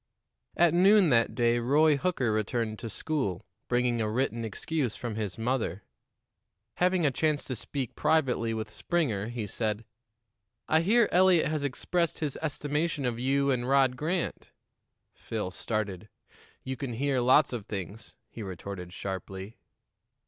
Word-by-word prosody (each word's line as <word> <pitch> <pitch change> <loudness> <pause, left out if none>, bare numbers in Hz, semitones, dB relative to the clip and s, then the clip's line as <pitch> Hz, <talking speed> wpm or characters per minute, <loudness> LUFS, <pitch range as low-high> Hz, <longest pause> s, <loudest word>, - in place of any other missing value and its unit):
At 170 -2 +5
noon 190 +1 +6
that 115 -3 +3
day 120 -1 +3
Roy 145 +5 +4
Hooker 140 -6 0
returned 110 +1 -1
to 115 - -5
school, 110 - -2 0.2
bringing 120 -1 +1
a 110 - 0
written 115 0 -1
excuse 125 +3 -2
from 120 -3 -4
his 105 -4 -3
mother. 115 -4 -1 0.9
Having 180 -1 +2
a 145 - +3
chance 150 +2 0
to 130 - -4
speak 130 +2 -4
privately 140 -7 +1
with 110 -1 -4
Springer, 120 - -1
he 120 -2 -4
said: 110 +1 -2 0.8
"I 160 +1 +4
hear 220 +5 +4
Eliot 180 -1 +5
has 155 -2 -1
expressed 170 +5 -1
his 150 -4 -3
estimation 150 -1 -1
of 120 -2 -1
you 140 +2 +2
and 125 -1 -1
Rod 135 -2 +4
Grant." 165 +6 -3 0.6
Phil 105 -5 -4
started. 105 -1 -3 0.5
"You 130 0 -3
can 135 -3 -4
near 135 +1 0
lots 130 +3 +4
of 110 -3 -5
things," 100 +2 -6
he 115 - -9
retorted 95 -2 -7
sharply. 95 +2 -6
125 Hz, 145 wpm, -29 LUFS, 110-150 Hz, 0.9 s, noon